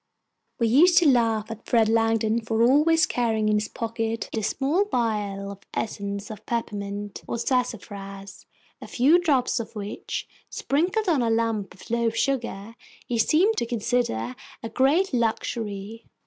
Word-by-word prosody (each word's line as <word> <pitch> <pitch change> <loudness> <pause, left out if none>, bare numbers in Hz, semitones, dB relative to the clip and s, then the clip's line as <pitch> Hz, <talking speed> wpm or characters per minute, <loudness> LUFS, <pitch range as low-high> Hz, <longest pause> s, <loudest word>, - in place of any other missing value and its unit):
We 230 - +2
used 330 +10 +5
to 340 - +6
laugh 230 -4 +2
at 225 0 -9
Fred 230 -2 +3
Langdon 225 0 +2
for 225 0 0
always 300 +6 +4
carrying 220 -3 0
in 210 - +3
his 210 - -3
pocket 225 0 -3
a 220 - -1
small 285 - +1
vial 210 - -2
of 200 - -10 0.2
essence 200 -1 -4
of 215 0 -9
peppermint 205 -3 -4
or - - -2
sassafras, 200 -6 -4 0.3
a - - -8
few 290 +8 +4
drops 275 -9 +1
of 230 - -7
which, 205 -1 -5 0.2
sprinkled 365 +9 0
on 315 -7 +3
a 235 - +1
lump 225 -4 -1
of 190 - -14
loaf 235 -1 +1
sugar, 230 -5 -2 0.3
he 235 -2 -2
seemed 365 - +3
to - - 0
consider 225 - -1 0.3
a 225 - -4
great 290 +9 +2
luxury. 225 -2 -2
230 Hz, 150 wpm, -25 LUFS, 210-255 Hz, 0.3 s, to